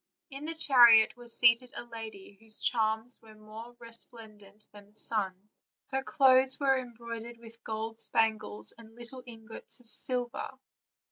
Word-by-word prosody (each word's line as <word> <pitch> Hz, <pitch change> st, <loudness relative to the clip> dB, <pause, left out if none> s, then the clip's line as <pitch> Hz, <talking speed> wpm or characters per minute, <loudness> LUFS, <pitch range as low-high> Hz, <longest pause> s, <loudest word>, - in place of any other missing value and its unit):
In 275 Hz, +2 st, -8 dB
the 330 Hz, +1 st, -4 dB
chariot 240 Hz, -8 st, +6 dB
was 240 Hz, -1 st, -2 dB
seated 240 Hz, +1 st, +4 dB
a -, -, -6 dB
lady, 220 Hz, -4 st, -10 dB
whose 220 Hz, -1 st, +2 dB
charms 220 Hz, +1 st, +1 dB
were 220 Hz, -1 st, -17 dB
more 220 Hz, +3 st, -12 dB
resplendent 220 Hz, -3 st, -8 dB
thr.n 205 Hz, 0 st, -17 dB
the -, -, -30 dB
sun; 195 Hz, -2 st, -3 dB, 0.4 s
her 265 Hz, 0 st, -1 dB
clothes 265 Hz, -2 st, +4 dB
were 275 Hz, -2 st, +3 dB
em 250 Hz, -2 st, -6 dB
broidered 235 Hz, 0 st, -8 dB
with 230 Hz, 0 st, -14 dB
gold 220 Hz, +1 st, -5 dB
spangles 110 Hz, -, 0 dB
arid 225 Hz, -1 st, -15 dB
little 240 Hz, +2 st, -10 dB
ingots 225 Hz, 0 st, -3 dB
of 245 Hz, -, -18 dB
silver. 250 Hz, +2 st, -2 dB
230 Hz, 150 wpm, -29 LUFS, 220-245 Hz, 0.4 s, chariot